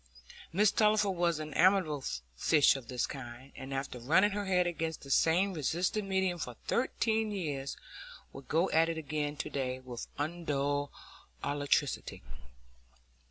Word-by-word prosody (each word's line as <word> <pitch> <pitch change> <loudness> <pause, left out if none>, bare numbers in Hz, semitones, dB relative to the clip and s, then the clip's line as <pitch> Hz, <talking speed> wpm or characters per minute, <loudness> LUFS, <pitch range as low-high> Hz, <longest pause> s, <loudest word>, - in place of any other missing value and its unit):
Mrs 205 +4 +3
Tulliver 210 -2 +4
was 170 -3 +1
an 155 -1 -6
amiable 180 -7 +3 0.3
fish 145 - +4
of 130 -4 -7
this 125 -2 -1
kind, 130 0 -9
and 135 +1 -8
after 135 -2 -4
running 175 - +4
her 205 0 -2
head 180 -2 +2
against 165 -2 -3
the 140 - -7
same 180 +7 +3
resisting 180 +6 -1
medium 190 -2 +1
for 125 -6 -5
thirteen 225 -3 +1
years 145 -9 -3 0.6
would 135 0 -10
go 165 +4 +2
at 165 +1 +4
it 165 - -2
again 150 -1 -2
to - - -3
day 130 -2 -2
with 125 -2 -7
undulled 145 -3 -1 0.5
alacrity. 145 - 0
155 Hz, 145 wpm, -32 LUFS, 140-185 Hz, 0.6 s, Tulliver